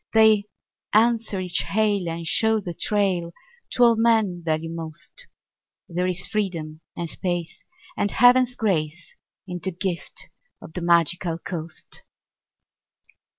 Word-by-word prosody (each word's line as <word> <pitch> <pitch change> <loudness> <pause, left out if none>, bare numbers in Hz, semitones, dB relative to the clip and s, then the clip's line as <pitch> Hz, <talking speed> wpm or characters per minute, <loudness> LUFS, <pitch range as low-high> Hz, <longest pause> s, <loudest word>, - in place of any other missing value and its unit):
They 220 -2 +6 0.5
answer 225 -2 +3
each 180 -3 0
hail 200 +3 +1
and 165 0 -4
show 220 +6 +3
the 180 -4 -5
trail 185 -3 0 0.4
To 245 - +4
all 235 -1 +6
men 220 -6 +2
value 160 0 -1
most. 165 - -5 0.6
There 180 +1 -1
is 180 0 -2
freedom 165 -7 -3 0.2
and 170 - -2
space 175 -1 -3 0.3
and 205 - 0
Heaven's 250 +2 +5
grace 175 -7 -1 0.3
In 180 -1 -5
the 190 - -2
gift 180 0 -4 0.3
of - - -12
the 180 - -4
Magical 170 0 +2
Coast. 165 -2 -7
180 Hz, 125 wpm, -24 LUFS, 170-215 Hz, 0.6 s, They